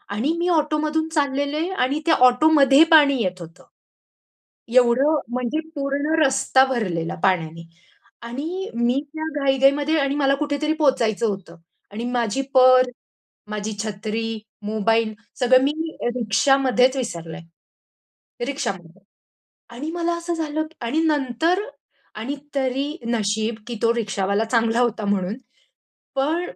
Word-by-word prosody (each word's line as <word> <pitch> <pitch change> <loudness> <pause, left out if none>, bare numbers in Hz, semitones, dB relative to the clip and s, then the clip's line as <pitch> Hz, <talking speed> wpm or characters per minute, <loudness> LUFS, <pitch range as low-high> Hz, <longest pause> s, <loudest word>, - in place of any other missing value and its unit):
आणि 270 +9 0
मी 350 - 0
ऑटो 305 -2 +1
मधून 315 +1 -1
चाललेले 290 +1 -1 0.2
आणि 285 +4 -2
त्या 330 - +4
ऑटोमध्ये 275 +2 +5
पाणी 280 -5 +6
येत 185 -1 -3
होतं. 165 +2 -12 1.1
एवढं 255 +5 +4
म्हणजे 250 +5 -1 0.2
पूर्ण 285 +2 -1
रस्ता 265 0 +3
भरलेला 185 -11 -2
पाण्याने 165 -3 0 0.6
आणि 325 +11 -5
मी 240 +3 +1
त्या 315 0 -4 0.2
घाई-घाईमध्ये 275 +3 +3
आणि 275 0 0
मला 275 -1 +2
कुठेतरी 295 +1 -1
पोहचायचं 240 -7 +1
होतं 195 -4 -5 0.4
आणि 225 +3 -5
माझी 240 +2 0
पर्स, 255 -1 +6 0.6
माझी 210 0 -4
छत्री, 220 +1 -4 0.2
मोबाईल 220 +1 0 0.3
सगळं 255 +1 +5
मी 285 - +2 0.4
रिक्षामध्येच 255 +3 +2
विसरले, 170 -10 -5 1.1
रिक्षामध्ये 195 -10 -5 0.8
आणि 295 +6 -5
मला 345 0 -1
असं 340 0 -4
झालं 315 -1 -2 0.2
आणि 290 +7 0
नंतर 305 +4 +1 0.6
आणि 235 +7 -4 0.2
तरी 270 +1 -1 0.2
नशीब 220 0 -1
की 240 - -5
तो 230 0 +3
रिक्षावाला 200 -1 -1
चांगला 230 0 +1
होता 230 -3 0
म्हणून, 200 0 -1 0.8
पण 305 +6 0
255 Hz, 120 wpm, -22 LUFS, 220-290 Hz, 1.1 s, पाणी